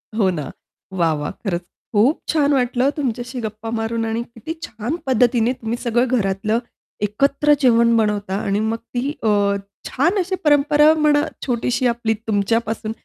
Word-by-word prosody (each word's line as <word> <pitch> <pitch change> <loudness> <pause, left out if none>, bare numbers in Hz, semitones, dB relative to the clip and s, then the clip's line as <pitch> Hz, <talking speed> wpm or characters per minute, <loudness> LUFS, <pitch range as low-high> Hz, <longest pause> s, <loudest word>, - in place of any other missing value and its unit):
हो 200 -4 +3
ना. 150 -6 -5 0.5
वाह! 165 -2 +3
वाह! 150 - -3
खरंच 180 -4 -1 0.3
खूप 240 +9 +4
छान 290 -2 +2
वाटलं 250 0 +2
तुमच्याशी 245 -2 -3
गप्पा 215 +1 -6
मारून 225 0 -2
आणि 225 +1 -1
किती 235 +7 -8
छान 225 +7 -4
पद्धतीने 245 -1 +2
तुम्ही 225 +1 -2
सगळं 240 +1 +1
घरातलं 215 +2 0 0.5
एकत्र 280 +7 +2
जेवण 235 -2 +4
बनवता 210 -3 0
आणि 200 0 0
मग 230 - -2
ती 245 +4 -4
अ, 220 - +2 0.6
छान 340 +10 +1
अशी 375 +1 -1
परंपरा 295 +1 +5
म्हणा 295 -1 +4 0.2
छोटीशी 245 0 0
आपली 235 -2 0
तुमच्यापासून 220 +2 0
235 Hz, 145 wpm, -20 LUFS, 220-265 Hz, 0.6 s, परंपरा